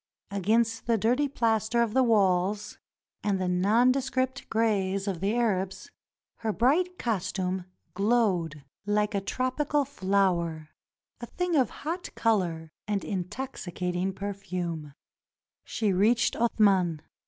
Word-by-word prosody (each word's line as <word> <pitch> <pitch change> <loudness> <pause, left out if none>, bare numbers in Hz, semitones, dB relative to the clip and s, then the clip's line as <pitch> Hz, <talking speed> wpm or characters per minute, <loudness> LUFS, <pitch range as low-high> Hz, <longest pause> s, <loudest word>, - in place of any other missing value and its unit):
Against 225 +4 +1
the 230 -1 +3
dirty 245 +7 +2
plaster 225 -3 +1
of 220 -2 -3
the 265 - +4
walls 205 -3 +2 0.4
and 200 -2 +1
the 185 - -1
nondescript 255 +8 +1
grays 200 -3 0
of 190 -4 -2
the 200 +5 0
Arabs, 195 -5 -1 0.5
her 225 -1 -2
bright 335 - +2
costume 185 -4 -2 0.3
glowed 190 -8 +1 0.2
like 210 +1 +1
a 200 - 0
tropical 270 +7 0
flower 185 - 0 0.3
— - - -35
a 240 - -5
thing 360 +3 -1
of 260 -6 +3 0.2
hot 345 +4 -3
color 175 -8 0 0.2
and 205 -2 -1
intoxicating 185 -3 -3
perfume. 180 -6 -5 0.7
She 210 -4 0
reached 220 +5 +3
Athman. 195 -8 +2
205 Hz, 120 wpm, -28 LUFS, 185-235 Hz, 0.7 s, the